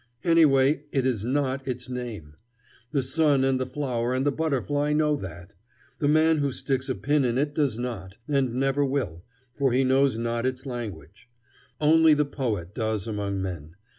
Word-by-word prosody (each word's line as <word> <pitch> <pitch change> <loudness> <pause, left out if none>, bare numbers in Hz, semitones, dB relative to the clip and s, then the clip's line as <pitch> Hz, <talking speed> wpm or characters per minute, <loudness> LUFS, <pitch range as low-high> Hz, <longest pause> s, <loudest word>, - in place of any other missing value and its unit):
Anyway, 150 -4 +4
it 135 -2 0
is 120 -6 0
not 135 +1 -1
its 125 0 -4
name. 120 -12 -6 0.6
The 140 -3 +1
sun 140 0 +2
and 135 -1 +2
the 130 - -2
flower 125 -3 -2
and 130 +2 0
the 145 - +3
butterfly 145 0 0
know 150 0 +2
that. 85 - -9 0.5
The 145 - +1
man 155 +1 +4
who 140 -1 0
sticks 135 0 -2
a 130 - 0
pin 145 0 +1
in 120 -1 0
it 145 +2 0
does 140 -7 0
not, 105 -6 -5
and 135 -5 0
never 135 +2 +1
will, 130 - -2 0.3
for 135 +1 +1
he 130 +2 +3
knows 130 -2 +3
not 115 +1 -1
its 130 +1 -4
language. 115 - -7 0.5
Only 160 +1 +5
the 150 0 +2
poet 110 -11 -3
does 110 -3 -2
among 100 -3 -3
men. 85 -4 -6
130 Hz, 175 wpm, -26 LUFS, 115-145 Hz, 0.6 s, Only